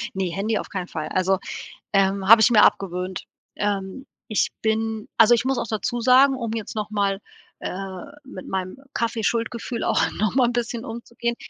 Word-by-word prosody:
Ne, 190 -2 -1
Handy 210 +5 -1
auf - - -7
keinen 185 -2 -4
Fall 155 -1 -5
also, 185 0 +1 0.5
ähm, 195 0 +2
habe 225 0 +9
ich 225 - +6
mir 215 -3 +6
abgewöhnt. 185 -1 +1 0.3
Ähm, 205 +5 -3 0.2
ich 215 - +1
bin 220 0 -1
also 230 +1 +7
ich 235 - 0
muss 265 -1 0
auch - - -2
dazusagen, 250 +5 +3
um 235 -3 -4
jetzt 225 -2 -5
nochmal, 205 -2 -1 0.4
äh, 190 0 -5 0.2
mit 190 -8 -10
meinem 190 +4 -3 0.2
Kaffee-Schuldgefühl 230 +1 -1
auch - - +2
noch 215 +2 -1
mal 255 -2 +4
'n - - -1
bisschen 235 0 -2
umzugehen. 235 0 -4
215 Hz, 165 wpm, -23 LUFS, 195-235 Hz, 0.5 s, habe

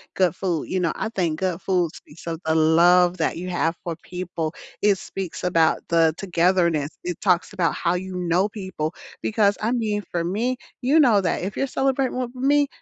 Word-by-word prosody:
good 180 -2 +2
food, 175 -5 -2
you 185 - 0
know, 170 -3 +1
I - - -3
think 175 -8 -1
good 185 -1 -1
foods 180 -4 0
speaks 165 +3 -15
of 165 -1 -3
the 160 0 +1
love 175 +3 +5
that 165 -1 0
you 180 +1 -5
have 170 -1 0
for 170 -2 -3
people. 175 -3 -4 0.3
It 205 -2 +4
speaks 185 -2 -6
about 165 -3 +3
the 165 -2 +4
togetherness. 170 -4 +1
It 175 -1 -4
talks 180 -1 +2
about 180 -4 +1
how 170 -1 0
you 185 +1 -5
know 180 +3 +1
people, 185 -6 -4 0.3
because 205 -2 +2
I 220 +2 0
mean, 215 -4 0
for 170 -1 -1
me, 230 +8 -1 0.2
you 285 +6 +4
know 235 -8 +5
that 185 - -1
if 195 +2 -4
you're 275 - 0
celebrating 265 -1 0
with 250 0 -3
me, 285 +2 +3
180 Hz, 195 wpm, -23 LUFS, 170-205 Hz, 0.3 s, love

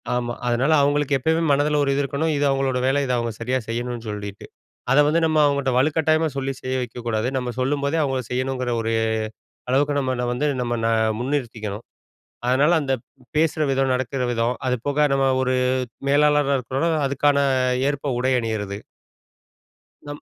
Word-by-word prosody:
ஆமா. 120 -1 -2
அதனால 125 +5 +2
அவுங்களுக்கு 145 0 +2
எப்பயுமே 160 +5 +1
மனதில 145 +1 +2
ஒரு 140 - 0
இது 140 - +1
இருக்கணும். 140 +4 -1
இது 145 - +1
அவுங்களோட 135 -1 0
வேல 135 +2 +2
தான் 125 - +2
அவுங்க 115 -1 -3
சரியா 125 +3 0
செய்யணுன்னு 120 0 -4
சொல்லீட்டு. 105 -1 -6 0.5
அத 135 - +5
வந்து 160 +3 +3
நம்ம 155 -1 +1
அவங்கட்ட 140 -2 +1
வலுக்கட்டாயமா 155 +3 +2
சொல்லி 135 0 -1
செய்ய 130 0 -3
வெக்கக்கூடாது. 120 -2 -3
நம்ம 125 -1 -2
சொல்லும்போதே 140 +3 0
அவங்க 135 -2 -1
செய்யணுங்கற 130 0 -2
ஒரு 115 0 -1 0.8
அளவுக்கு 145 +2 +2
நம்ம 130 -2 -1
வந்து 130 +5 -1 0.2
நம்ம 120 -1 -1
ந - - +3 0.3
முன்னிறுத்திக்கணும். 120 -5 -3 0.6
அதனால 140 +6 +3
அந்த 135 -2 -1 0.4
பேசுற 155 0 +1
விதம், 135 0 +1
நடக்கற 130 +1 -2
விதம், 120 +1 0
அதுபோக 140 +4 0
நம்ம 135 0 +2
ஒரு 130 0 +1 0.6
மேலாளரா 145 -1 +3
இருக்கறோன்னா 130 +7 -1 0.2
அதுக்கான 140 +1 +2 0.5
ஏற்ப 140 -1 -2
உடை 130 +1 +1
அணியறது. 105 -4 -3 1.3
நம் 145 0 -7
135 Hz, 150 wpm, -22 LUFS, 125-145 Hz, 1.3 s, அத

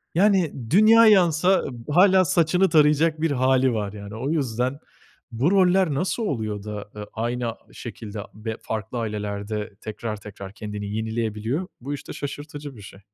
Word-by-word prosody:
yani, 190 -3 +3 0.2
dünya 220 +6 +7
yansa 185 -2 +4 0.2
hâla 185 +4 +5
saçını 180 +3 +3
tarayacak 155 0 +3
bir 165 -1 +1
hâli, 130 -1 +3
var 105 -2 -3
yani. 100 0 -8
O 125 +5 -3
yüzden 130 -3 -1 0.5
bu 130 +10 +1
roller 185 -3 +4
nasıl 185 - -1
oluyor 110 - -3
da, 105 -1 -6
eee, 105 0 -6
aynı 120 0 -2 0.2
şekilde 110 -3 -7
be 110 +1 -5
farklı 110 +2 -4
ailelerde 105 -1 -4
tekrar 110 0 -5
tekrar 100 -1 -9
kendini 105 -1 -6
yenileyebiliyor? 110 - -2
Bu 140 +4 -4
işte 145 - -7
şaşırtıcı 145 0 -7
bir 105 - -12
şey. 100 0 -12
125 Hz, 145 wpm, -24 LUFS, 110-165 Hz, 0.5 s, dünya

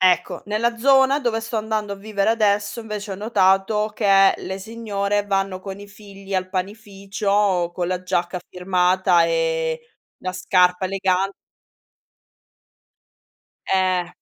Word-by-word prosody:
Ecco, 185 -1 +2
nella 225 +3 -1
zona 270 +2 +4
dove 240 -5 -1
sto 225 0 -5
andando 215 -1 -2
a - - -13
vivere 200 0 -1
adesso, 210 -1 +1
invece, 210 -2 -6
ho - - -4
notato 205 0 +2
che 195 -2 +4
le 190 +1 -6
signore 205 -2 -2
vanno 195 -1 -1
con 195 +1 -8
i 205 - -11
figli 200 -1 -10
al 185 0 -1
panificio, 195 -1 -1
con 175 -1 -2
la 185 -1 -2
giacca 175 0 -1
firmata 180 -1 +2
e 160 -1 0 0.4
la 185 - -4
scarpa 180 0 +2
elega 190 0 0 2.4
Eh 185 -2 +1
195 Hz, 125 wpm, -22 LUFS, 185-210 Hz, 2.4 s, zona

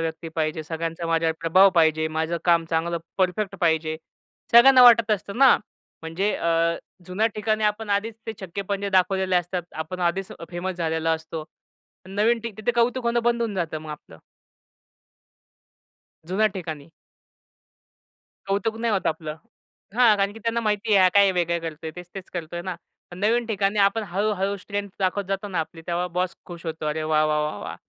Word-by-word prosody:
व्यक्ती 165 0 -4
पाहिजे. 155 -1 -2
सगळ्यांचा 165 +1 -4
माझ्यावर 165 -1 +1
प्रभाव 185 +4 +5
पाहिजे, 160 -1 +3
माझं 160 +2 -2
काम 170 -2 +4
चांगलं 170 +1 0 0.2
परफेक्ट 195 +2 0
पाहिजे. 160 -1 +1 0.6
सगळ्यांना 255 +2 +8
वाटत 230 -3 +7
असतं 200 0 -2
ना. 270 -1 +7 0.5
म्हणजे 175 +6 -1
अ, 165 0 +1 0.3
जुन्या 195 +5 +1
ठिकाणी 215 0 0
आपण 210 0 -1
आधीच 210 +3 0
ते 225 - -3
छक्के-पंजे 200 +2 -4
दाखवलेले 190 0 +2
असतात. 175 +1 -1
आपण 160 +4 -5
आधीच 180 +2 -1 0.2
फेमस 180 +1 -4
झालेलो 160 -1 -1
असतो. 160 -1 -2 0.6
नवीन 220 +4 +1
ठिक 230 -3 -7
तिथे 215 +3 0
कौतुक 240 +1 +1
होणं 235 0 +1
बंद 235 0 +1
होऊन 220 -3 -2
जातं 165 -4 -2
मग 155 0 -9
आपलं. 80 - -11 2.1
जुन्या 195 +5 +2
ठिकाणी. 160 -5 -6 1.6
कौतुक 200 +3 -1
नाही 230 -1 0
होतं 195 - +1
आपलं. 155 -1 -4 0.6
हां, 235 -3 +5
कारण 200 0 0
की 225 - -11
त्यांना 230 +1 -1
माहिती 210 -1 0
आहे 195 - +6
हा 185 - +7
काय 200 -1 +6
वेगळं 170 -1 0
करतो 160 -1 -6
आहे? - - -3
तेच-तेच 180 +1 -9
करतो 170 -1 -5
आहे 175 - -4
ना? 185 0 -4 0.4
पण 175 - -10
नवीन 230 +4 +1
ठिकाणी 205 -2 0
आपण 200 +3 +3
हळू-हळू 200 0 0
स्ट्रेंग्थ 200 0 -5
दाखवत 190 +2 0
जातो 195 +1 -2
ना 185 -3 -3
आपली 165 +1 -7
तेव्हा 175 +1 -1
बॉस 185 0 0
खुश 170 -1 -10
होतो. 160 -1 -4
"अरे 155 +1 -1
वाह! 155 0 +2
वाह! 150 0 +1
वाह! 105 - -6
वाह! - - -6
185 Hz, 170 wpm, -24 LUFS, 165-210 Hz, 2.1 s, सगळ्यांना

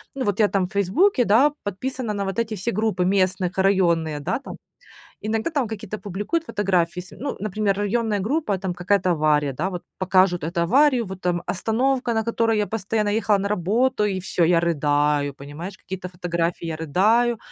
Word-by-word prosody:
ну, 270 - -2
вот 205 0 -1
я 210 - +5
там 195 -2 0
в - - -21
"Фейсбуке", 245 - +2
да, 245 +9 +5
подписана 230 +3 -3
на 200 -1 -2
вот 195 +2 -3
эти 225 -1 -1
все 210 +5 -2
группы 210 -3 0
местных, 185 -1 +1
районные, 170 -6 +2
да, 175 - -1
там. - - -9 0.7
Иногда 220 +7 -1
там 285 -6 0
какие-то 215 -1 -6
публикуют 205 - -3
фотографии. 180 - 0
Ес 180 - -12
ну, 280 +2 -4
например, 210 -1 0
районная 210 +1 0
группа, 225 -1 0
там 185 -1 -3
какая-то 185 +1 +1
авария, 150 -3 +2
да, 170 +9 -2
вот 180 -2 -5 0.2
покажут 185 -2 +2
эту 170 +2 -2
аварию, 255 - +3
вот 190 0 -8
там 175 -1 -1
остановка, 245 +5 0
на 220 - +1
которой 230 -1 +1
я 210 - +1
постоянно 215 0 -1
ехала 210 -1 +2
на 200 - -1
работу- 210 +5 +1
и 195 -2 -1
всё, 175 -1 0
я 170 0 +4
рыдаю, 145 -3 +1
понимаешь? 150 +7 -8
Какие-то 185 -1 -7
фотографии- 170 -1 -2
я 160 -1 -3
рыдаю, 215 +10 +2
195 Hz, 185 wpm, -23 LUFS, 175-220 Hz, 0.7 s, я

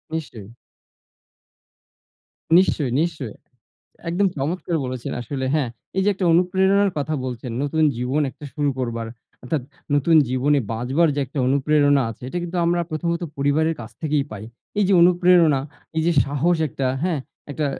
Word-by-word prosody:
নিশ্চয়ই। 115 -10 -6 2.1
নিশ্চয়, 155 -7 +2
নিশ্চয়ই। 155 -9 -3 0.7
একদম 190 +4 +2
চমৎকার 165 +4 -2
বলেছেন, 125 -1 -4
আসলে 130 +2 -4
হ্যাঁ? 140 -6 +1 0.3
এই 190 - +2
যে, - - +3
একটা 190 - -3
অনুপ্রেরণার 190 +3 +3
কথা 155 +2 -2
বলছেন, 125 -1 -5
নতুন 155 +2 0
জীবন 125 +5 -1
একটা 150 - -14
শুরু 145 -2 +1
করবার 115 -2 -3 0.4
অর্থাৎ 130 +2 -2 0.3
নতুন 160 +3 +4
জীবনে 135 +3 +2
বাঁচবার 130 +9 +1
যে, 145 - -1
একটা 140 +2 -7
অনুপ্রেরণা 145 +1 +3
আছে, 115 - -12
এটা 175 - -3
কিন্তু 175 +1 -5
আমরা 175 +1 +2
প্রথমত 170 +2 -2
পরিবারের 150 +4 +1
কাছ 110 - -8
থেকেই 150 -2 +1
পাই। 105 0 -7 0.3
এই 205 - +4
যে, - - +3
অনুপ্রেরণা, 175 -5 +5 0.4
এই 160 - +2
যে, 175 - +3
সাহস, 145 +5 +1
একটা 130 0 -3 0.2
হ্যাঁ? 165 -6 0 0.3
একটা 150 +1 -1
150 Hz, 150 wpm, -22 LUFS, 130-170 Hz, 2.1 s, অনুপ্রেরণা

